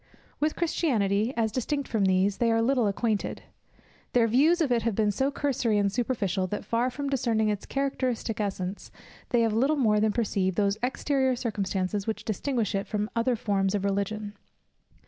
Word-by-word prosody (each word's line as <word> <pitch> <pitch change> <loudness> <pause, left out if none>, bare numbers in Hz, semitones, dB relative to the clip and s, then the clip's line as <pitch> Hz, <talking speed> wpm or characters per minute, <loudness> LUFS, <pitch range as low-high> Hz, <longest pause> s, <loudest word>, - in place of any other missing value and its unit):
With 305 +1 0
Christianity, 225 - +1
as 220 -2 +1
distinct 275 +4 -2
from 215 -4 +1
these, 190 +1 +2
they 235 -1 +2
are 225 - +3
little 240 -1 +2
acquainted; 210 +1 -1 0.7
their 240 -2 +4
views 290 +10 +4
of 305 -6 +1
it 235 -1 +3
have 225 -2 -1
been 210 -1 +2
so 265 +7 0
cursory 255 -6 0
and 200 -1 +2
superficial, 200 -6 -1
that 210 - -4
far 235 +2 +1
from 280 +3 -4
discerning 235 -5 +1
its 205 -1 -3
characteristic 255 -5 -2
essence, 195 -1 -4 0.4
they 240 - +3
have 225 -2 +2
little 270 +7 +2
more 220 -7 +3
than 215 0 +2
perceived 195 -5 0
those 200 0 +1
exterior 265 +1 +1
circumstances 195 -3 -2
which 220 - -3
distinguish 225 0 -1
it 195 0 -2
from 210 0 -2
other 235 +2 +2
forms 200 -3 0
of 200 -1 -1
Religion. 205 +1 -2
220 Hz, 175 wpm, -27 LUFS, 200-255 Hz, 0.7 s, their